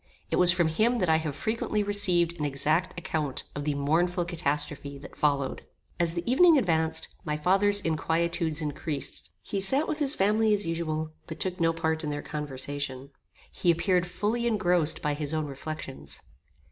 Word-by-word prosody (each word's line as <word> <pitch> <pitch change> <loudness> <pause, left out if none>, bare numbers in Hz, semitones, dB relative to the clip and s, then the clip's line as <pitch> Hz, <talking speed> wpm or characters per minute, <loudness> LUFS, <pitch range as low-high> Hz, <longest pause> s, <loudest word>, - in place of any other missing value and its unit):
It - - +1
was 180 -1 +7
from 175 -2 +2
him 225 +10 +1
that 180 -6 0
I 160 - +4
have 155 -3 -4
frequently 215 +4 -2
received 175 -4 +2
an - - -2
exact 155 +6 0
account 155 -5 -3
of 145 0 -5
the 150 -1 0
mournful 170 +5 0
catastrophe 150 -4 -3
that 140 - -12
followed. 140 -3 -1 0.4
As 170 -1 +1
the 170 - -2
evening 320 +6 +5
advanced, 160 -8 0
my 150 -1 -2
father's 200 +5 +3
inquietudes 165 -1 0
increased. 145 - -4
He 195 - -3
sat 265 +11 +4
with 310 - -2
his 290 -1 +6
family 210 +2 +2
as 205 - +2
usual, 160 -2 -3 0.2
but 160 - -8
took 185 0 -1
no 165 0 +3
part 160 0 -2
in 150 - -3
their 145 0 -4
conversation. 140 -2 -3 0.4
He 175 - -1
appeared 180 +1 +2
fully 215 +6 -1
engrossed 175 -8 +2
by 150 -1 0
his 150 +1 -2
own 155 -1 -1
reflections. 140 0 -7
165 Hz, 170 wpm, -27 LUFS, 150-185 Hz, 0.4 s, was